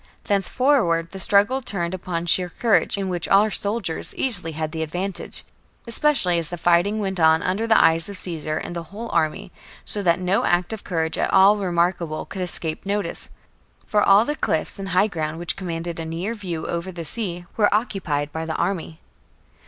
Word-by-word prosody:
Thenceforward 200 Hz, -, +1 dB
the 195 Hz, -, -8 dB
struggle 205 Hz, +7 st, +4 dB
turned 175 Hz, -7 st, -3 dB
upon 175 Hz, -2 st, -4 dB
sheer 180 Hz, +1 st, +2 dB
courage, 220 Hz, +2 st, +1 dB
in 195 Hz, -1 st, -2 dB
which 175 Hz, -2 st, -2 dB
our 210 Hz, +2 st, +4 dB
soldiers 200 Hz, -6 st, -3 dB
easily 180 Hz, -11 st, +2 dB
had 155 Hz, 0 st, -3 dB
the 160 Hz, 0 st, -4 dB
advantage, 180 Hz, +4 st, -3 dB, 0.4 s
especially 235 Hz, -, +2 dB
as 165 Hz, -2 st, -1 dB
the 175 Hz, -, -5 dB
fighting 175 Hz, +5 st, +2 dB
went 190 Hz, -3 st, -2 dB
on 160 Hz, 0 st, +4 dB
under 205 Hz, +5 st, -1 dB
the 220 Hz, -, +5 dB
eyes 165 Hz, +4 st, +4 dB
of 200 Hz, -, -7 dB
Caesar 155 Hz, -4 st, 0 dB
and 175 Hz, -, -5 dB
the 170 Hz, -, -3 dB
whole 225 Hz, +4 st, -7 dB
army, 155 Hz, -, -1 dB, 0.3 s
so 205 Hz, -, -1 dB
that 170 Hz, -2 st, +2 dB
no 185 Hz, +2 st, +1 dB
act 175 Hz, +4 st, +1 dB
of 220 Hz, -, -7 dB
courage 160 Hz, -2 st, -2 dB
at -, -, 0 dB
all 195 Hz, +2 st, +6 dB
remarkable 175 Hz, -4 st, -1 dB
could 190 Hz, -, -7 dB
escape 165 Hz, -3 st, -2 dB
notice; 205 Hz, +1 st, -2 dB, 0.6 s
for 210 Hz, -, +1 dB
all 200 Hz, +3 st, +5 dB
the 295 Hz, -, -2 dB
cliffs 160 Hz, -, -1 dB
and 195 Hz, 0 st, -5 dB
high 185 Hz, +3 st, +3 dB
ground 160 Hz, -6 st, -3 dB
which 170 Hz, 0 st, -2 dB
commanded 170 Hz, -2 st, -5 dB
a 165 Hz, -, -4 dB
near 170 Hz, +7 st, -3 dB
view 180 Hz, -7 st, -5 dB
over 170 Hz, +2 st, -3 dB
the 170 Hz, -2 st, -7 dB
sea 175 Hz, -1 st, -2 dB
were 210 Hz, -2 st, +3 dB
occupied 185 Hz, -9 st, -1 dB
by 160 Hz, +1 st, -4 dB
the 160 Hz, -1 st, -4 dB
army. 170 Hz, -3 st, -2 dB
180 Hz, 190 wpm, -22 LUFS, 165-200 Hz, 0.6 s, all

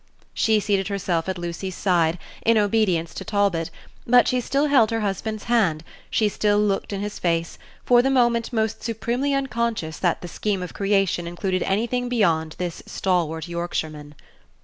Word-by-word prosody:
She 220 Hz, -1 st, +2 dB
seated 200 Hz, -2 st, 0 dB
herself 190 Hz, -4 st, -1 dB
at 190 Hz, -, -2 dB
Lucy's 175 Hz, +2 st, -5 dB
side, 175 Hz, -3 st, +2 dB, 0.3 s
in 230 Hz, 0 st, +4 dB
obedience 205 Hz, -6 st, +1 dB
to -, -, -6 dB
Talbot; 195 Hz, -5 st, 0 dB, 0.4 s
but 245 Hz, +1 st, +6 dB
she 250 Hz, 0 st, +1 dB
still 275 Hz, +4 st, +1 dB
held 265 Hz, -7 st, +4 dB
her 225 Hz, -1 st, -1 dB
husband's 210 Hz, +1 st, -3 dB
hand, 195 Hz, -10 st, +1 dB, 0.3 s
she 215 Hz, -, +2 dB
still 205 Hz, 0 st, +1 dB
looked 205 Hz, -1 st, 0 dB
in 200 Hz, -1 st, -3 dB
his 210 Hz, 0 st, -5 dB
face, 165 Hz, -1 st, -1 dB, 0.3 s
for 240 Hz, -1 st, +6 dB
the 265 Hz, -, +1 dB
moment 240 Hz, -3 st, +2 dB
most 220 Hz, -2 st, -1 dB
supremely 240 Hz, +4 st, -1 dB
unconscious 235 Hz, -11 st, -2 dB
that 175 Hz, -3 st, +1 dB
the -, -, -5 dB
scheme 195 Hz, +2 st, -2 dB
of 180 Hz, -, -7 dB
creation 195 Hz, -4 st, +1 dB
included 185 Hz, +1 st, -2 dB
anything 240 Hz, +5 st, 0 dB
beyond 165 Hz, -10 st, +1 dB
this 175 Hz, -2 st, -4 dB
stalwart 165 Hz, -3 st, -1 dB
Yorkshireman. 155 Hz, -4 st, -4 dB
200 Hz, 165 wpm, -23 LUFS, 175-230 Hz, 0.4 s, but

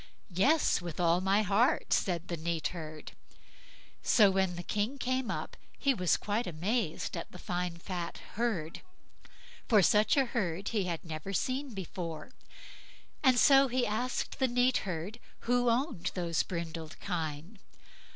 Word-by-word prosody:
"Yes! 275 Hz, -, +3 dB
with 175 Hz, -1 st, -6 dB
all 170 Hz, 0 st, +3 dB
my 195 Hz, +3 st, +3 dB
heart", 225 Hz, -, +2 dB
said 175 Hz, -3 st, 0 dB
the 175 Hz, -, -2 dB
neat 165 Hz, -1 st, -2 dB
herd. 155 Hz, -3 st, -8 dB, 0.9 s
So 205 Hz, -4 st, +5 dB
when 190 Hz, -2 st, +1 dB
the 175 Hz, -, -6 dB
King 210 Hz, +9 st, -1 dB
came 255 Hz, -2 st, -1 dB
up, -, -, -4 dB, 0.2 s
he 275 Hz, -2 st, +2 dB
was 180 Hz, -7 st, +2 dB
quite 210 Hz, +3 st, -2 dB
amazed 180 Hz, +3 st, -2 dB
at 165 Hz, -, -6 dB
the -, -, -10 dB
fine 180 Hz, -1 st, -3 dB
fat 175 Hz, 0 st, -5 dB, 0.2 s
herd, 195 Hz, -9 st, -2 dB, 0.9 s
for 210 Hz, -5 st, +6 dB
such 210 Hz, -, +4 dB
a 270 Hz, -, +4 dB
herd 195 Hz, -6 st, -2 dB
he 210 Hz, -5 st, 0 dB
had 170 Hz, -2 st, -4 dB
never 160 Hz, +4 st, -5 dB
seen 255 Hz, +3 st, -2 dB
before, 175 Hz, +1 st, -6 dB, 0.9 s
and 260 Hz, -3 st, +5 dB
so 275 Hz, +1 st, +7 dB
he 255 Hz, 0 st, +1 dB
asked 240 Hz, +6 st, -2 dB
the 260 Hz, -, +3 dB
neat 250 Hz, +1 st, +3 dB
herd 180 Hz, +7 st, -4 dB, 0.2 s
who 245 Hz, 0 st, +2 dB
owned 235 Hz, -, 0 dB
those 170 Hz, -3 st, 0 dB
brindled 165 Hz, -2 st, -5 dB
kine. 165 Hz, +4 st, -4 dB
190 Hz, 150 wpm, -31 LUFS, 170-240 Hz, 0.9 s, so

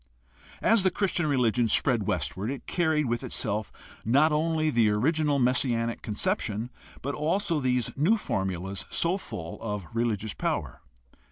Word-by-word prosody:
As 225 Hz, -1 st, +5 dB
the 190 Hz, -, +3 dB
Christian 180 Hz, -3 st, 0 dB
religion 125 Hz, -4 st, +2 dB
spread 115 Hz, -1 st, +2 dB
westward 90 Hz, -, -1 dB
it 135 Hz, 0 st, -5 dB
carried 160 Hz, -3 st, +1 dB
with 120 Hz, -1 st, -1 dB
itself 105 Hz, -1 st, -2 dB, 0.3 s
not 140 Hz, +8 st, +4 dB
only 155 Hz, 0 st, +1 dB
the 115 Hz, -5 st, +3 dB
original 145 Hz, +7 st, +2 dB
messianic 120 Hz, -2 st, +1 dB
conception 115 Hz, -, -2 dB, 0.3 s
but 140 Hz, +2 st, -2 dB
also 165 Hz, +2 st, 0 dB
these 125 Hz, -3 st, 0 dB
new 170 Hz, +11 st, +3 dB
formulas 95 Hz, -, -3 dB
so 170 Hz, +3 st, +1 dB
full 90 Hz, -, -7 dB
of 105 Hz, -4 st, -4 dB
religious 110 Hz, -3 st, -1 dB
power. -, -, -3 dB
125 Hz, 140 wpm, -27 LUFS, 110-155 Hz, 0.3 s, As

